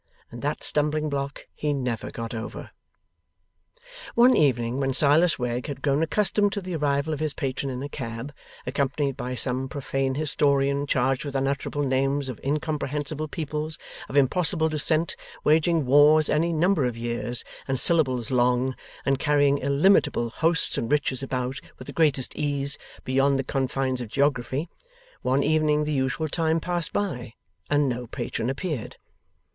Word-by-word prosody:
And 120 Hz, -, -8 dB
that 145 Hz, +1 st, -2 dB
stumbling 150 Hz, +1 st, +2 dB
block 140 Hz, 0 st, -4 dB
he 150 Hz, -1 st, -1 dB
never 125 Hz, -5 st, -3 dB
got 115 Hz, 0 st, -6 dB
over. 115 Hz, 0 st, -6 dB, 1.4 s
One 245 Hz, +2 st, +6 dB
evening, 125 Hz, -3 st, +2 dB
when 135 Hz, -1 st, 0 dB
Silas 150 Hz, +5 st, +4 dB
Wegg 125 Hz, 0 st, -2 dB
had 140 Hz, -2 st, -6 dB
grown 140 Hz, +1 st, +2 dB
accustomed 205 Hz, +4 st, +1 dB
to 200 Hz, -, -3 dB
the 180 Hz, -2 st, -5 dB
arrival 145 Hz, 0 st, 0 dB
of 150 Hz, -, -4 dB
his 155 Hz, -2 st, -1 dB
patron 135 Hz, -1 st, -2 dB
in 130 Hz, 0 st, -4 dB
a -, -, -3 dB
cab, 125 Hz, 0 st, -6 dB, 0.3 s
accompanied 140 Hz, +1 st, -1 dB
by 125 Hz, -1 st, -4 dB
some 130 Hz, +2 st, 0 dB
profane 135 Hz, -2 st, -2 dB
historian 140 Hz, -1 st, +1 dB
charged 130 Hz, 0 st, +1 dB
with 140 Hz, -2 st, -6 dB
unutterable 140 Hz, +2 st, -1 dB
names 135 Hz, +1 st, 0 dB
of 125 Hz, -, -6 dB
incomprehensible 150 Hz, +1 st, -2 dB
peoples, 155 Hz, 0 st, -4 dB, 0.3 s
of 140 Hz, -, -2 dB
impossible 160 Hz, +3 st, +3 dB
descent, 155 Hz, +2 st, +1 dB, 0.3 s
waging 160 Hz, 0 st, +3 dB
wars 145 Hz, +3 st, +5 dB
any 165 Hz, +3 st, +2 dB
number 165 Hz, -2 st, +2 dB
of 120 Hz, -2 st, -2 dB
years 120 Hz, +1 st, -2 dB, 0.2 s
and 135 Hz, -1 st, 0 dB
syllables 130 Hz, -9 st, +4 dB
long, 125 Hz, +1 st, +2 dB, 0.3 s
and 135 Hz, -1 st, +1 dB
carrying 145 Hz, -1 st, +3 dB
illimitable 140 Hz, -, +2 dB
hosts 165 Hz, +4 st, 0 dB
and 115 Hz, -, -3 dB
riches 145 Hz, -3 st, +1 dB
about, 130 Hz, 0 st, -3 dB, 0.2 s
with 130 Hz, -, -10 dB
the -, -, -8 dB
greatest 145 Hz, -5 st, +1 dB
ease, 140 Hz, -1 st, -1 dB, 0.3 s
beyond 135 Hz, +1 st, +2 dB
the 135 Hz, -, -1 dB
confines 130 Hz, -1 st, -1 dB
of 120 Hz, -, -6 dB
geography 140 Hz, +2 st, 0 dB, 0.5 s
one 135 Hz, +2 st, +1 dB
evening 150 Hz, 0 st, +2 dB
the 150 Hz, 0 st, -2 dB
usual 135 Hz, +3 st, 0 dB
time 160 Hz, +1 st, 0 dB
passed 175 Hz, -1 st, -2 dB
by, 130 Hz, -, -3 dB, 0.3 s
and 145 Hz, 0 st, +3 dB
no 125 Hz, -1 st, -3 dB
patron 120 Hz, -1 st, -3 dB
appeared. 140 Hz, -, -4 dB
140 Hz, 155 wpm, -25 LUFS, 130-155 Hz, 1.4 s, One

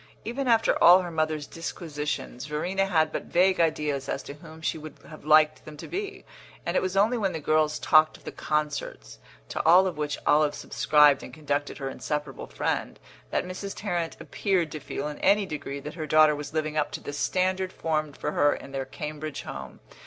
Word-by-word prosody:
Even 260 Hz, +4 st, -3 dB
after 230 Hz, -2 st, +3 dB
all 180 Hz, +2 st, +9 dB
her 175 Hz, -, -6 dB
mother's 155 Hz, -2 st, -1 dB
disquisitions 150 Hz, -5 st, -5 dB
Verena 180 Hz, +6 st, -1 dB
had 160 Hz, -4 st, +2 dB
but -, -, -4 dB
vague 185 Hz, +1 st, +3 dB
ideas 150 Hz, -4 st, 0 dB
as 135 Hz, -, -2 dB
to -, -, -8 dB
whom 160 Hz, +2 st, -13 dB
she 160 Hz, -, -1 dB
would 155 Hz, -2 st, -9 dB
have 155 Hz, -2 st, -12 dB
liked 155 Hz, 0 st, +4 dB
them 155 Hz, -1 st, -11 dB
to -, -, -8 dB
be; 400 Hz, +1 st, -5 dB, 0.4 s
and -, -, -2 dB
it -, -, +3 dB
was 185 Hz, +1 st, -2 dB
only 225 Hz, +5 st, +3 dB
when 195 Hz, -3 st, 0 dB
the 160 Hz, -, -3 dB
girl 155 Hz, +1 st, +2 dB
talked 155 Hz, +1 st, +3 dB
of -, -, -23 dB
the -, -, -6 dB
concerts, 150 Hz, -1 st, -3 dB, 0.3 s
to -, -, -3 dB
all 180 Hz, +3 st, +7 dB
of 185 Hz, -5 st, -3 dB
which 150 Hz, -1 st, -2 dB
Olive 150 Hz, 0 st, +3 dB
subscribed 150 Hz, -2 st, +4 dB
and -, -, -9 dB
conducted 145 Hz, -2 st, -2 dB
her 135 Hz, -, -4 dB
inseparable 150 Hz, +2 st, -4 dB
friend, -, -, -2 dB, 0.3 s
that -, -, -1 dB
Mrs. 185 Hz, +2 st, -6 dB
Tarrant 175 Hz, -5 st, -3 dB
appeared 185 Hz, -6 st, -1 dB
to 155 Hz, -, -5 dB
feel 145 Hz, 0 st, -5 dB
in 150 Hz, -, -7 dB
any 200 Hz, +1 st, +3 dB
degree 145 Hz, -4 st, -5 dB
that 150 Hz, +2 st, -7 dB
her 155 Hz, -3 st, -5 dB
daughter 155 Hz, 0 st, +5 dB
was 145 Hz, -1 st, -6 dB
living 155 Hz, -1 st, -2 dB
up 150 Hz, -1 st, +1 dB
to -, -, -3 dB
the 145 Hz, -, -7 dB
standard 185 Hz, +4 st, 0 dB
formed 155 Hz, -4 st, -2 dB
for -, -, -2 dB
her 145 Hz, 0 st, +3 dB
in 135 Hz, -, -10 dB
their 135 Hz, -1 st, -3 dB
Cambridge 150 Hz, +2 st, -6 dB
home. 65 Hz, -1 st, -8 dB
155 Hz, 205 wpm, -27 LUFS, 150-180 Hz, 0.4 s, all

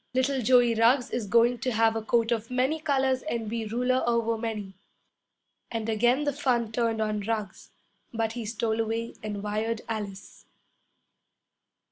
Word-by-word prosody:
Little 260 Hz, +1 st, +1 dB
Joey 245 Hz, 0 st, +5 dB
Ruggs 240 Hz, +3 st, +3 dB
is 225 Hz, -4 st, -2 dB
going 235 Hz, +3 st, +3 dB
to 255 Hz, +2 st, -1 dB
have 225 Hz, 0 st, +3 dB
a 225 Hz, -, -1 dB
coat 230 Hz, +1 st, +1 dB
of 230 Hz, -1 st, -1 dB
many 260 Hz, +5 st, 0 dB
colors 265 Hz, -4 st, +1 dB
and 235 Hz, -7 st, -3 dB
be 225 Hz, 0 st, -3 dB
ruler 250 Hz, +3 st, +1 dB
over 230 Hz, -1 st, +1 dB
many!' 220 Hz, -4 st, -4 dB, 1.0 s
And 225 Hz, -2 st, -3 dB
again 240 Hz, +5 st, +2 dB
the 290 Hz, -1 st, 0 dB
fun 245 Hz, -5 st, 0 dB
turned 230 Hz, -1 st, 0 dB
on 215 Hz, -1 st, 0 dB
Ruggs, 210 Hz, -2 st, -4 dB, 0.4 s
but 225 Hz, -1 st, -1 dB
he 235 Hz, 0 st, -5 dB
stole 220 Hz, +1 st, -2 dB
away 225 Hz, +1 st, -3 dB
and 210 Hz, -1 st, -5 dB
wired 215 Hz, +2 st, -2 dB
Alice. 205 Hz, -3 st, -6 dB
230 Hz, 155 wpm, -27 LUFS, 220-245 Hz, 1.0 s, Joey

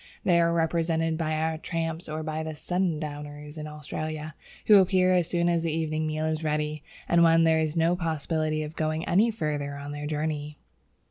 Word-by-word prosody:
They 175 Hz, -2 st, +4 dB
are 170 Hz, 0 st, +3 dB
represented 165 Hz, -1 st, +1 dB
by 160 Hz, -1 st, -1 dB
our 160 Hz, 0 st, -1 dB
tramps 165 Hz, 0 st, -3 dB
or 155 Hz, +1 st, -3 dB
by 155 Hz, 0 st, -3 dB
the 160 Hz, 0 st, -5 dB
"sundowners" 150 Hz, -4 st, -3 dB
in 155 Hz, -1 st, -6 dB
Australia, 155 Hz, +1 st, -5 dB, 0.3 s
who 210 Hz, -2 st, +8 dB
appear 185 Hz, -1 st, +3 dB
as 175 Hz, -3 st, +2 dB
soon 175 Hz, -1 st, +1 dB
as 170 Hz, -1 st, +2 dB
the 165 Hz, -1 st, -1 dB
evening 155 Hz, 0 st, -1 dB
meal 155 Hz, 0 st, -2 dB
is 160 Hz, 0 st, -1 dB
ready 150 Hz, 0 st, -1 dB, 0.3 s
and 170 Hz, 0 st, +4 dB
when 165 Hz, 0 st, +5 dB
there 160 Hz, -1 st, +4 dB
is 160 Hz, +1 st, -1 dB
no 165 Hz, +2 st, +3 dB
possibility 155 Hz, -2 st, -1 dB
of 155 Hz, +1 st, -7 dB
going 155 Hz, +1 st, -1 dB
any 205 Hz, +7 st, +3 dB
further 150 Hz, -9 st, -2 dB
on 140 Hz, 0 st, -7 dB
their 145 Hz, 0 st, -5 dB
journey. 150 Hz, -1 st, -3 dB
160 Hz, 190 wpm, -27 LUFS, 150-165 Hz, 0.3 s, who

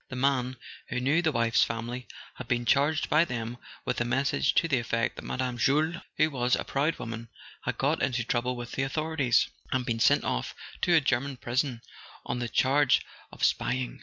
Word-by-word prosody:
The 125 Hz, -, -6 dB
man, 130 Hz, -1 st, +1 dB, 0.3 s
who 125 Hz, -, -1 dB
knew 140 Hz, +7 st, +2 dB
the 160 Hz, -2 st, +2 dB
wife's 115 Hz, -3 st, +3 dB
family, 120 Hz, +2 st, -4 dB, 0.3 s
had 130 Hz, -, -9 dB
been 120 Hz, -1 st, 0 dB
charged 145 Hz, +6 st, +2 dB
by 155 Hz, +2 st, +4 dB
them 120 Hz, -5 st, -4 dB, 0.3 s
with -, -, -1 dB
a -, -, +4 dB
message 130 Hz, +3 st, +1 dB
to 165 Hz, -, +3 dB
the 135 Hz, -6 st, +2 dB
effect 115 Hz, 0 st, -1 dB
that -, -, -8 dB
Mme. 125 Hz, -1 st, -2 dB
Jules, 155 Hz, +7 st, +2 dB, 0.2 s
who 155 Hz, 0 st, +3 dB
was 125 Hz, -2 st, +2 dB
a -, -, -3 dB
proud 145 Hz, +4 st, 0 dB
woman, 115 Hz, 0 st, -6 dB, 0.4 s
had -, -, -2 dB
got -, -, +1 dB
into 125 Hz, -3 st, 0 dB
trouble 120 Hz, +2 st, -1 dB
with 120 Hz, -1 st, -7 dB
the -, -, -2 dB
authorities, 145 Hz, -1 st, +1 dB, 0.2 s
and 130 Hz, -1 st, 0 dB
been 115 Hz, -2 st, -1 dB
sent -, -, +4 dB
off -, -, -2 dB, 0.3 s
to 175 Hz, -, +4 dB
a 160 Hz, -, +6 dB
German 135 Hz, +1 st, 0 dB
prison 120 Hz, 0 st, -1 dB, 0.4 s
on 125 Hz, -, -2 dB
the 120 Hz, -1 st, -2 dB
charge 135 Hz, +2 st, +3 dB, 0.3 s
of -, -, -13 dB
spy¬ 125 Hz, -, +2 dB
ing. 130 Hz, -1 st, -4 dB
125 Hz, 200 wpm, -28 LUFS, 120-140 Hz, 0.4 s, a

